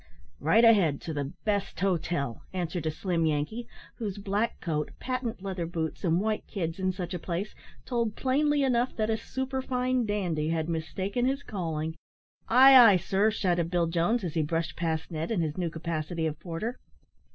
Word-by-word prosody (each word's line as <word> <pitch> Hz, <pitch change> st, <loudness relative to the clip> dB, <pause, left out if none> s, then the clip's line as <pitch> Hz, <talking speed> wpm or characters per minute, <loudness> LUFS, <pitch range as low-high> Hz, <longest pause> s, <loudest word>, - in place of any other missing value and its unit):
"Right 210 Hz, -, +5 dB
ahead 190 Hz, -11 st, +5 dB
to 160 Hz, -, -5 dB
the 145 Hz, -1 st, -3 dB
best 205 Hz, -2 st, -1 dB
hotel," 170 Hz, -9 st, -1 dB
answered 175 Hz, -2 st, -2 dB
a -, -, +3 dB
slim 170 Hz, +1 st, -1 dB
Yankee, 155 Hz, +11 st, -2 dB, 0.3 s
whose 210 Hz, -4 st, -4 dB
black 205 Hz, +3 st, -1 dB
coat, 150 Hz, -3 st, -2 dB
patent 250 Hz, -6 st, -3 dB
leather 185 Hz, -4 st, -3 dB
boots, 165 Hz, 0 st, -4 dB
and 170 Hz, -1 st, +2 dB
white 215 Hz, +1 st, -1 dB
kids, 170 Hz, -3 st, -3 dB
in 185 Hz, 0 st, +1 dB
such 185 Hz, -1 st, -5 dB
a 180 Hz, -, -3 dB
place, 180 Hz, +5 st, -3 dB, 0.3 s
told 235 Hz, -4 st, -1 dB
plainly 290 Hz, +2 st, +2 dB
enough 250 Hz, -1 st, +1 dB
that 220 Hz, 0 st, 0 dB
a -, -, +2 dB
superfine 255 Hz, -1 st, -1 dB
dandy 175 Hz, -7 st, -1 dB
had 160 Hz, -1 st, 0 dB
mistaken 185 Hz, +8 st, -2 dB
his 275 Hz, +2 st, 0 dB
calling. 160 Hz, -5 st, -3 dB, 0.5 s
"Ay, 265 Hz, +3 st, +8 dB
ay, 230 Hz, -7 st, +9 dB
sir!" 195 Hz, +4 st, +2 dB
shouted 175 Hz, -6 st, 0 dB
Bill 175 Hz, -1 st, +2 dB
Jones, 175 Hz, +8 st, +1 dB
as 170 Hz, -4 st, -3 dB
he 160 Hz, -, +1 dB
brushed 160 Hz, 0 st, -1 dB
past 160 Hz, 0 st, -2 dB
Ned, 160 Hz, 0 st, -3 dB
in 215 Hz, -7 st, +1 dB
his 155 Hz, -2 st, -2 dB
new 175 Hz, -2 st, -1 dB
capacity 160 Hz, 0 st, -3 dB
of 155 Hz, -1 st, -3 dB
porter. 185 Hz, +8 st, -4 dB
185 Hz, 175 wpm, -28 LUFS, 165-225 Hz, 0.5 s, ay